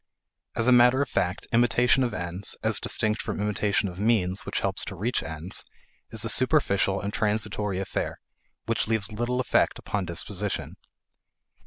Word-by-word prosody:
As 115 Hz, -, +1 dB
matter 125 Hz, +2 st, +6 dB
of 135 Hz, -, -7 dB
fact, 90 Hz, -1 st, -1 dB
imitation 120 Hz, +2 st, +4 dB
of 120 Hz, -, 0 dB
ends, 90 Hz, +3 st, -2 dB
as 110 Hz, -1 st, +2 dB
distinct 110 Hz, -2 st, 0 dB
from -, -, -4 dB
imitation 105 Hz, 0 st, +1 dB
of 90 Hz, 0 st, -8 dB
means 100 Hz, -4 st, +1 dB
which -, -, -1 dB
help 95 Hz, 0 st, -1 dB
to 100 Hz, -, -3 dB
reach 115 Hz, +7 st, -1 dB
ends, 80 Hz, +3 st, -4 dB, 0.5 s
is 115 Hz, -1 st, -1 dB
a -, -, 0 dB
superficial 115 Hz, -7 st, +2 dB
and 100 Hz, 0 st, -4 dB
transitory 105 Hz, -2 st, -1 dB
affair 95 Hz, 0 st, -3 dB, 0.5 s
which 115 Hz, -1 st, 0 dB
leaves 110 Hz, -3 st, 0 dB
little 120 Hz, +3 st, -1 dB
effect 130 Hz, -, +2 dB
upon 100 Hz, -2 st, -3 dB
disposition. 85 Hz, -1 st, -3 dB
105 Hz, 155 wpm, -26 LUFS, 95-120 Hz, 0.5 s, matter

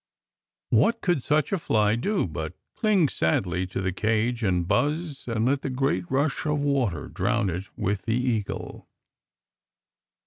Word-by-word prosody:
What 230 Hz, 0 st, +3 dB
could 175 Hz, -7 st, +1 dB
such 150 Hz, +2 st, +1 dB
a 195 Hz, -, +1 dB
fly 105 Hz, -7 st, +2 dB
do 195 Hz, -, 0 dB
but 80 Hz, 0 st, -5 dB, 0.2 s
cling 205 Hz, -7 st, +3 dB
sadly 90 Hz, -1 st, 0 dB
to 95 Hz, +1 st, -4 dB
the 95 Hz, 0 st, 0 dB
cage 110 Hz, +5 st, 0 dB
and 90 Hz, -5 st, +1 dB
buzz 145 Hz, -, 0 dB
and 115 Hz, -1 st, 0 dB
let 135 Hz, +2 st, +2 dB
the -, -, -3 dB
great 125 Hz, -9 st, 0 dB
rush 140 Hz, +2 st, 0 dB
of 150 Hz, 0 st, +1 dB
water 135 Hz, -, 0 dB
drown 95 Hz, -, 0 dB
it 90 Hz, +4 st, -4 dB
with 100 Hz, -1 st, -1 dB
the 115 Hz, 0 st, +1 dB
eagle? 120 Hz, -5 st, -3 dB
115 Hz, 150 wpm, -26 LUFS, 95-145 Hz, 0.2 s, What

